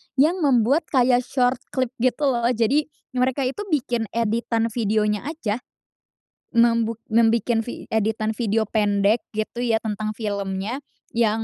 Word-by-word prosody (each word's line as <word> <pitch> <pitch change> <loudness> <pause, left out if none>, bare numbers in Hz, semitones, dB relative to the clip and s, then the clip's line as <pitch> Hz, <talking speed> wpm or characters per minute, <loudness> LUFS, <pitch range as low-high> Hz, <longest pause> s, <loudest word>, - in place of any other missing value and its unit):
yang 310 +7 +3
membuat 280 +1 +3
kayak 250 -2 +3
short 250 -1 +1 0.2
clip 255 -2 0
gitu, 255 +4 +1
loh. 235 -1 +1
Jadi, 260 +7 +2 0.2
mereka 255 +1 0
itu 260 +8 -2
bikin 245 - -1
editan 230 0 0
videonya 210 0 0
aja, 250 -9 -2 1.0
membuk 230 -1 +3
membikin 230 0 +3
vi - - -6
editan 220 0 0
video 220 -1 0
pendek, 205 +1 +2 0.2
gitu 215 +2 -3
ya 230 -2 +2
tentang 215 0 -3
filmnya, 200 +2 -3 0.3
yang 225 -1 +1
230 Hz, 130 wpm, -23 LUFS, 215-250 Hz, 1.0 s, yang